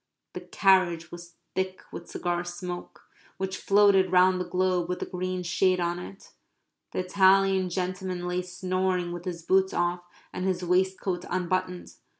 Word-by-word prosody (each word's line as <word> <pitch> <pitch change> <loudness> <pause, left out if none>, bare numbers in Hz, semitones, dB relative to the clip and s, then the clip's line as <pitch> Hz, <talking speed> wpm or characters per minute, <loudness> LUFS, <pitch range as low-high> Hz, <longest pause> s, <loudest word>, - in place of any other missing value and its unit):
The - - -6
carriage 180 -4 +2
was 175 0 -11 0.2
thick 190 0 -3
with 170 - -9
cigar 175 0 -2
smoke, 175 0 -7 0.3
which 190 0 -3
floated 195 -2 +4
round 185 0 +4
the 180 - -5
globe 180 -1 0
with 180 - -1
the - - -4
green 185 0 -3
shade 185 +1 +2
on 175 0 -1
it. 195 +2 -11 0.6
The - - -7
Italian 190 0 +4
gentleman 185 0 -3
lay 180 0 -1
snoring 185 0 -1
with 175 +1 -7
his 170 -2 -5
boots 190 +2 +2
off 175 0 0 0.3
and 180 - -4
his 185 -1 -1
waistcoat 185 0 0
unbuttoned.... 185 0 -2
180 Hz, 150 wpm, -27 LUFS, 175-190 Hz, 0.6 s, floated